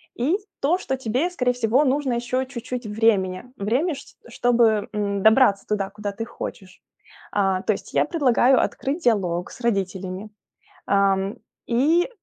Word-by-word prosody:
и 290 +10 +1 0.2
то, 320 +6 +3
что 265 -8 -3
тебе, 260 +7 0
скорее 250 -9 0
всего, 245 +3 +2
нужно 270 -1 +1
еще 245 +2 -1
чуть-чуть 250 -2 -6
времени, 210 -3 +1
время 260 - 0
ш 280 - -13
чтобы, 230 -3 +2
м, 200 -1 -1
добраться 220 -3 +5
туда, 200 -2 -1
куда 205 0 -5
ты 220 +3 -5
хочешь. 190 -4 -8 0.5
А, 195 -2 +1
то 215 - +2
есть - - -9
я - - +3
предлагаю 265 -5 +3
открыть 295 +6 -2
диалог 180 -7 +1
с - - -12
родителями, 195 -2 -2 0.6
ам, 195 0 +1 0.3
и 300 +9 +2
230 Hz, 145 wpm, -23 LUFS, 200-260 Hz, 0.6 s, добраться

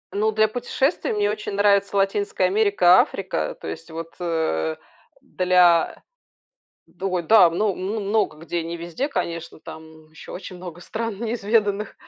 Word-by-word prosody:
Ну, 215 +2 +1
для 215 0 +3
путешествий 250 +7 -1
мне 205 -1 +1
очень 210 -1 -5
нравится 200 0 +2
Латинская 195 -1 +1
Америка, 190 -2 +4
Африка. 185 - -1
То - - -7
есть, 80 - -7
вот 165 0 -7
э, 160 - -1 0.5
для. 180 -2 +2 0.8
Ду 190 +2 -5
ой, 180 -1 0
да, 210 +2 +6
мно 200 +5 0
мн 190 +4 -4
мн - - -4
много 210 -7 +1
где 170 +1 -3
не 170 +1 -5
везде, 170 - -4
конечно, 170 - -4
там 160 0 -12
ещё 160 - -12
очень 185 0 -8
много 175 -1 -9
стран 220 +3 -5
неизведанных, 215 -2 0
190 Hz, 155 wpm, -23 LUFS, 170-210 Hz, 0.8 s, да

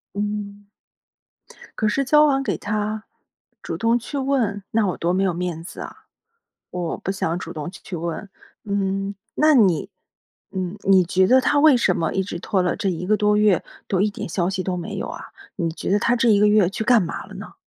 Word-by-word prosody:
嗯。 205 0 -4 1.1
可 215 - +2
是 275 +6 0
交 300 +3 +5
还 270 -1 +1
给 - - -1
他， 215 +1 -3 0.6
主 - - -4
动 230 +1 +2
去 275 +4 -5
问， 245 -7 0
那 220 -2 +2
我 180 - -2
多 170 +1 0
没 190 - +1
有 190 -2 +2
面 175 -2 -3
子 170 - -10
啊？ - - -9 0.7
我， 175 -2 -3
不 - - -4
想 170 -3 -2
主 165 -2 -7
动 155 0 -5
去 185 0 -8
问。 170 +4 -4 0.4
嗯， 195 -1 -1 0.2
那 310 0 +4
你 190 - +3 0.6
嗯， 185 0 -3
你 190 -2 +5
觉 185 +2 +2
得 255 +6 +5
他 290 +3 +2
为 305 -3 +7
什 195 -7 +2
么 165 - -1
一 190 - 0
直 185 -2 -6
拖 185 +1 0
了 180 - 0
这 195 - -1
一 180 0 -4
个 215 - +3
多 210 0 +2
月 210 -4 +3 0.2
都 190 - +1
一 210 +2 +2
点 205 - -6
消 175 +1 0
息 190 -1 -2
都 185 -1 -2
没 175 -1 -5
有 - - -4
啊？ - - -8 0.3
你 170 -4 -1
觉 160 - -5
得 200 - +4
他 235 - +2
这 235 0 +2
一 210 -2 +5
个 210 - +5
月 210 -3 +4
去 200 +3 -4
干 235 -2 +5
嘛 170 - -5
了 - - -12
呢？ - - -9
200 Hz, 230 characters per minute, -22 LUFS, 180-215 Hz, 1.1 s, 为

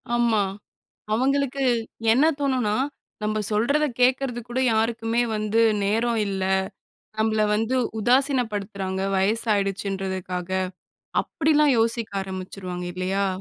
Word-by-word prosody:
ஆமா. 230 -4 +3 0.7
அவங்களுக்கு 275 +3 +1 0.5
என்ன 260 +7 +4
தோனும்னா, 255 -7 +1 0.5
"நம்ம 215 0 0
சொல்றத 280 +9 +2
கேட்கறதுக்கு 250 -2 +1
கூட 250 +2 -1
யாருக்குமே 225 +1 +1
வந்து 215 +1 +1 0.2
நேரம் 225 +3 +1
இல்ல. 195 -1 -2 0.8
நம்மல 220 -1 +2
வந்து 225 +4 0 0.2
உதாசினப்படுத்துறாங்க 215 -7 0
வயசு 210 +5 +2
ஆயிடுச்சுன்றதுக்காக." 190 -2 -3 0.7
அப்டிலாம் 300 -3 +2
யோசிக்க 230 0 +1
ஆரம்பிச்சிருவாங்க 185 -1 -6
இல்லையா? 190 +2 0
220 Hz, 95 wpm, -24 LUFS, 195-245 Hz, 0.8 s, என்ன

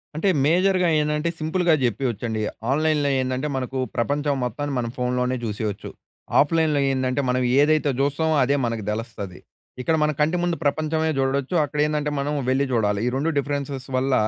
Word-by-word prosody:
అంటే 165 +6 +1 0.2
మేజర్‌గా 180 +2 +3
ఏందంటే 150 +2 0
సింపుల్‌గా 165 +2 +1
చెప్పేయచ్చండి. 120 -2 -2 0.3
ఆన్‍లైన్‍లో 150 0 +2
ఏందంటే 130 +2 -2
మనకు 130 0 -3 0.2
ప్రపంచం 145 +4 0
మొత్తాన్ని 145 +3 -3
మనం 120 -1 -2
ఫోన్‌లోనే 125 0 0
చూసేయచ్చు. 105 -2 -4 0.5
ఆఫ్‍లైన్‍లో 155 0 +3
ఏందంటే 130 +1 0
మనం 125 0 +1 0.2
ఏదైతే 150 -1 +3
చూస్తామో 150 +3 +1
అదే 140 +3 +2
మనకు 115 -2 -2
తెలుస్తది. 105 -4 -6 0.4
ఇక్కడ 160 +6 +1
మన 150 - +2
కంటి 160 +4 +2
ముందు 175 -1 +1
ప్రపంచమే 155 +2 +1
చూడొచ్చు. 135 +3 0
అక్కడ 145 +1 -4
ఏందంటే 150 -1 -1
మనం 145 +2 -1 0.2
వెళ్లి 135 +2 +2
చూడాలి. 105 -4 +1
ఈ - - +3
2 145 +5 0
డిఫరెన్సెస్ 140 -2 -3
వల్ల 130 +1 +1
140 Hz, 150 wpm, -23 LUFS, 125-155 Hz, 0.5 s, మేజర్‌గా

